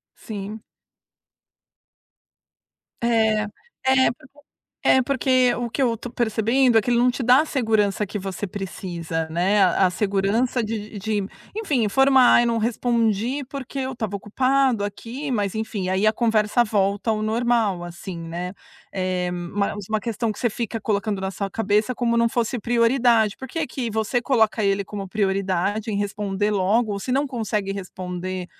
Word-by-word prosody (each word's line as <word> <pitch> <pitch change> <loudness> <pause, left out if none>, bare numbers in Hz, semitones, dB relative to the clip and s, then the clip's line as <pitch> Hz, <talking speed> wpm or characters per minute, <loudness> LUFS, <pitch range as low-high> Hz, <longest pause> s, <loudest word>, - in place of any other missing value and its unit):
Sim. 210 0 -7 2.4
É. 220 -2 +3 0.4
É. 265 0 +5
Porque 260 +4 -17 0.5
É 260 - +6
porque 255 -1 +2
o 240 -1 -2
que 275 - -2
eu 235 -3 +2
tô 245 - -8
percebendo 235 +1 +2
é - - +2
que 245 - -2
ele 235 - +3
não 250 +1 +4
te 250 - -6
dá 250 +3 +6
a - - +1
segurança 220 -7 +1
que 205 - -5
você 195 +1 -4
precisa, 175 -4 -4
né. 185 +6 +2
A 185 +1 +3
a - - +1
segurança 210 +6 0
de 215 -1 -5
de 205 -1 -1 0.3
enfim, 305 - 0
informar: 265 +3 +5
“Eu - - +1
não 230 -1 +1
respondi 235 +2 0
porque 275 0 -5
eu 260 0 -2
estava 220 -5 -4
ocupado 255 +2 +1
aqui", 240 +7 -5
mas 205 -3 -1
enfim, 220 -4 -3
aí 190 +3 +1
a 215 - +5
conversa 220 0 +2
volta 205 0 0
ao 215 - 0
normal, 225 -4 +1
assim, 175 +1 -7
né. 170 +2 -5 0.4
Eh, 185 -1 -1
mais 195 +3 -3
uma 215 0 +1
questão 230 0 -2
que - - -13
você 240 - +1
fica 225 0 -4
colocando 205 -1 -1
na 190 0 -3
sua 195 0 -4
cabeça, 215 +3 +1
como 235 -1 0
não 235 0 +3
fosse 240 +1 -1
prioridade. 230 -2 +3
Por 265 - -8
que - - -5
é 315 - 0
que 245 -4 -4
você 220 +3 0
coloca 220 -4 +2
ele 195 0 +1
como 200 -1 -6
prioridade, 195 +1 0
em 205 - -1
responder 205 0 -1
logo, 210 +3 +2
ou 200 - -4
se 250 - -5
não 280 +2 +2
consegue 215 -6 -2
responder, 185 -1 -5
215 Hz, 170 wpm, -23 LUFS, 195-240 Hz, 2.4 s, É